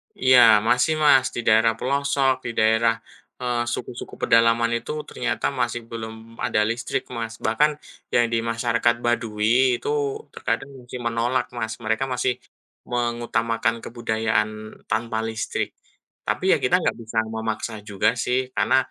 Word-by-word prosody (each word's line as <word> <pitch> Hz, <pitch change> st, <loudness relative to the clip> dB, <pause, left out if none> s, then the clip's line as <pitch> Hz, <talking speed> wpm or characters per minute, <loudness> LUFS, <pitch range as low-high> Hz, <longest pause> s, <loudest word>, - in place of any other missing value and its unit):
Iya, 130 Hz, -1 st, +5 dB, 0.3 s
masih, 125 Hz, +6 st, +3 dB
Mas. 135 Hz, -3 st, +6 dB
Di -, -, -2 dB
daerah 110 Hz, +1 st, +5 dB
pelosok, 140 Hz, 0 st, +1 dB
di 120 Hz, -, -2 dB
daerah, 110 Hz, +1 st, +4 dB, 0.5 s
eee, 120 Hz, -1 st, 0 dB
suku-suku 120 Hz, -, -6 dB
pedalaman 115 Hz, 0 st, +4 dB
itu, 115 Hz, -, -6 dB, 0.2 s
ternyata -, -, -2 dB
masih 120 Hz, 0 st, -1 dB
belum 110 Hz, -1 st, -6 dB, 0.3 s
ada 105 Hz, -, +2 dB
listrik, 115 Hz, +2 st, -2 dB
Mas. 115 Hz, -1 st, -4 dB
Bahkan, 130 Hz, +8 st, +3 dB, 0.4 s
yang 120 Hz, -, +4 dB
di 115 Hz, -, +3 dB
masyarakat 115 Hz, 0 st, +1 dB
Baduy, 120 Hz, +2 st, +2 dB
itu -, -, -3 dB, 0.4 s
terkadang 115 Hz, +4 st, -2 dB
masih 125 Hz, 0 st, -8 dB
menolak, 120 Hz, +2 st, 0 dB
Mas. 110 Hz, -2 st, -2 dB
Mereka 110 Hz, +4 st, +1 dB
masih 125 Hz, 0 st, +1 dB, 0.5 s
mengutamakan 120 Hz, -1 st, 0 dB
kebudayaan 110 Hz, -2 st, 0 dB, 0.4 s
tanpa 110 Hz, +1 st, -1 dB
listrik. 110 Hz, -1 st, -3 dB, 0.5 s
Tapi -, -, -1 dB
ya -, -, 0 dB
kita -, -, +4 dB
nggak -, -, 0 dB
bisa 115 Hz, 0 st, -7 dB, 0.2 s
memaksa 110 Hz, 0 st, -3 dB, 0.2 s
juga, 100 Hz, -2 st, +2 dB
sih. 125 Hz, +2 st, +1 dB, 0.2 s
Karena, 130 Hz, -, +3 dB
115 Hz, 135 wpm, -23 LUFS, 110-125 Hz, 0.5 s, Mas